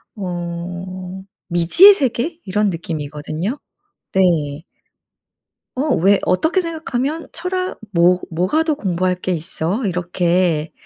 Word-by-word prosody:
어 180 0 -5 0.3
미지의 175 - +7
세계? 290 +2 -1
이런 205 +2 +1
느낌이거든요. 160 - -4 0.5
네. 160 -5 +1 1.1
어 270 0 +1
왜 195 +4 +4
어떻게 320 - +2
생각하면 320 -2 -3
철학, 365 +1 -3
뭐 180 +1 +4
뭐가 180 - +1
더 315 -2 0
공부할 185 -6 0
게 180 +1 -3
있어? 175 +6 -2
이렇게 175 -2 0
185 Hz, 215 characters per minute, -19 LUFS, 170-260 Hz, 1.1 s, 미지의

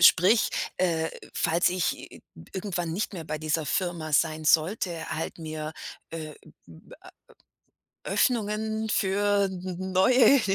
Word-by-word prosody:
sprich, 185 +6 +6 0.3
äh, 165 -3 +1 0.2
falls 170 +1 +2
ich 180 -1 0 0.2
i - - -14 0.3
irgendwann 180 -4 -3
nicht 205 +4 -2
mehr 165 -3 -6
bei 155 0 -4
dieser 155 +1 -1
Firma 165 0 -1
sein 155 +1 +2
sollte, 170 +2 +2
halt 155 +4 -4
mir, 155 -1 -5 0.4
äh, 155 -2 -6 0.3
b - - -15
a - - -14 0.9
Öffnungen 220 -2 0
für 205 0 +2
n 185 0 -4
neue 250 +7 +6
180 Hz, 125 wpm, -27 LUFS, 160-205 Hz, 0.9 s, sprich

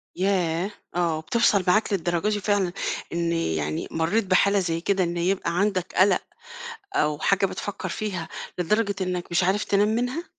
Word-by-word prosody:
ياه! 185 -1 0 0.2
آه، 170 -3 +1
بتوصل 205 +2 +2
معاك 210 +3 +3
للدرجة 175 +1 0
دي 210 -1 0
فعلًا 200 -3 +1 0.4
إن 170 0 0
يعني 80 - -1
مرّيت 170 +7 +1
بحالة 200 +2 +3
زي 165 -3 -1
كده 195 +1 +1
إن 175 0 -2
يبقى 175 -1 0
عندك 185 -3 0
قلق 190 +2 +4 0.7
أو 150 -1 +1
حاجة 195 +4 +2
بتفكّر 195 0 -5
فيها 185 -3 -4 0.3
لدرجة 200 +3 +1
إنك 180 -1 -2
مش 175 +1 +2
عارف 195 +3 +1
تنام 205 +1 +2
منها؟ 245 +9 -1
185 Hz, 155 wpm, -25 LUFS, 170-205 Hz, 0.7 s, قلق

